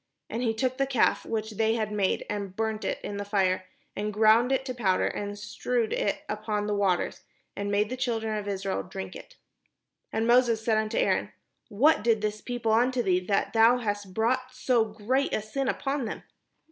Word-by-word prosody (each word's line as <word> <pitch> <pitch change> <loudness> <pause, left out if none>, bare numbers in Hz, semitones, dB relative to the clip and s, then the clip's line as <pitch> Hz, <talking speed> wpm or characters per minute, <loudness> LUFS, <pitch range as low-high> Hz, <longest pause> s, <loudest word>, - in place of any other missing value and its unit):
And 230 - -2
he 225 -3 0
took 255 +2 -1
the 275 - +2
calf 260 -4 +2
which 220 -1 -2
they 220 +1 +1
had 215 -2 -2
made, 205 -2 0
and 200 -2 -4
burnt 220 0 -2
it - - -1
in 205 - -4
the 205 - -3
fire, 190 -2 0 0.3
and 210 +1 -2
ground 220 +4 +4
it 265 0 +1
to 255 - -3
powder, 195 -7 +1
and 205 0 -3
strewed 220 +3 -2
it 200 - -1
upon 210 -1 -2
the 210 - -1
water, 195 -3 +1 0.4
and 200 0 -3
made 205 +2 +1
the - - -1
children 225 -4 -1
of 210 -1 -4
Israel 195 - -2
drink 95 -1 -7
of - - -8
it. - - -23 0.7
And 220 +1 0
Moses 235 -2 +3
said 220 -2 +3
unto 215 0 -2
Aaron: - - +1 0.4
"What 240 +6 +4
did 225 -2 +3
this 210 0 -2
people 240 -3 -2
unto 245 +2 +3
thee, 185 -3 +3
that 200 0 +1
thou 230 +2 +6
hast 205 -4 -3
brought 255 +5 0
so 250 -3 +2
great 225 +6 -1
a - - -1
sin 265 +5 -2
upon 275 -1 -1
them?" 215 - -5
220 Hz, 200 wpm, -27 LUFS, 205-240 Hz, 0.7 s, thou